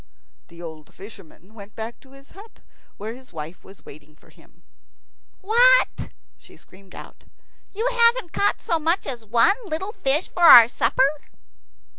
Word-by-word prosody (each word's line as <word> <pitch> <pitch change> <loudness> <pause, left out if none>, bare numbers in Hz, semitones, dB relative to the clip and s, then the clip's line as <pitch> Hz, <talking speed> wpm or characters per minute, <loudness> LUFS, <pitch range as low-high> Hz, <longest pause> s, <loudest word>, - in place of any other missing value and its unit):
The 170 0 -14
old 160 -2 -12
fisherman 195 -1 -15
went 210 -1 -14
back 225 +1 -8
to 265 0 -21
his 275 0 -19
hut, 415 +3 -17 0.4
where 215 +2 -7
his 255 +1 -16
wife 160 +1 -10
was 195 - -18
waiting 150 +1 -16
for - - -25
him. - - -25 0.8
"What!" - - +2 0.3
she - - -19
screamed 190 0 -19
out; - - -14 0.5
"you 445 +5 -3
haven't 470 -5 +1
caught 405 - -1
so 335 - -1
much 330 +4 -1
as 245 -4 -7
one 230 - +2
little 380 +1 -5
fish 305 - -1
for 355 - -9
our 240 -9 +9
supper?" 260 +2 0
255 Hz, 155 wpm, -21 LUFS, -, 0.8 s, our